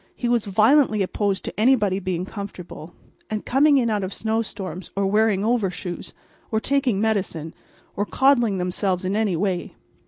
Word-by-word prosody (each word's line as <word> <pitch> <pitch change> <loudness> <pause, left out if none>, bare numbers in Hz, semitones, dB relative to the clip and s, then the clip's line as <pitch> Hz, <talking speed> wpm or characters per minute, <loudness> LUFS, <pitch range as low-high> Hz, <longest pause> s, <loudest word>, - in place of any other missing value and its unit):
He 245 - -3
was 240 -2 +1
violently 215 +2 +4
opposed 195 +1 -1
to - - -6
anybody 215 -5 +3
being 185 -2 -3
comfortable, 180 -5 -8 0.3
and 215 -1 -4
coming 285 +3 +4
in 235 -4 +1
out 205 -2 0
of 190 +1 -5
snow 220 0 0
storms, 185 -4 -7
or 200 0 +1
wearing 210 0 +2
overshoes, 195 -6 -2 0.3
or 220 - +1
taking 260 -4 +1
medicine, 190 -7 -1 0.4
or 205 +1 -1
coddling 240 -7 +3
themselves 180 +1 -1
in 190 +2 -1
any 210 -4 +1
way. 185 0 -2
205 Hz, 160 wpm, -23 LUFS, 185-225 Hz, 0.4 s, violently